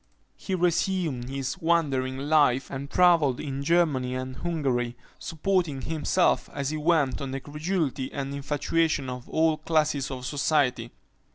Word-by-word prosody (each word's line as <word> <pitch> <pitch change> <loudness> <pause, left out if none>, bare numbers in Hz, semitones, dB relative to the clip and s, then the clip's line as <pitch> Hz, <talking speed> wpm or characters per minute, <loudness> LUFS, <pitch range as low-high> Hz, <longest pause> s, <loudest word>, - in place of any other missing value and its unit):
He 190 - -3
resumed 175 -7 0
his 135 +5 -4
wandering 140 -7 +1
life, 140 -2 +2
and 140 +1 -5
travelled 170 -8 +4
in 140 -1 -4
Germany 145 -6 +2
and 130 0 -5
Hungary, 130 -8 -1 0.2
supporting 165 -5 -1
himself 160 +3 +1
as 140 0 -2
he 155 - -2
went 150 -5 +1
on 135 - -4
the 135 +1 -3
credulity 150 -2 -2
and 140 0 -4
infatuation 145 0 0
of 125 -1 -8
all 160 -1 +2
classes 155 -3 0
of 130 -2 -6
society. 135 -4 +1
145 Hz, 135 wpm, -26 LUFS, 130-165 Hz, 0.2 s, travelled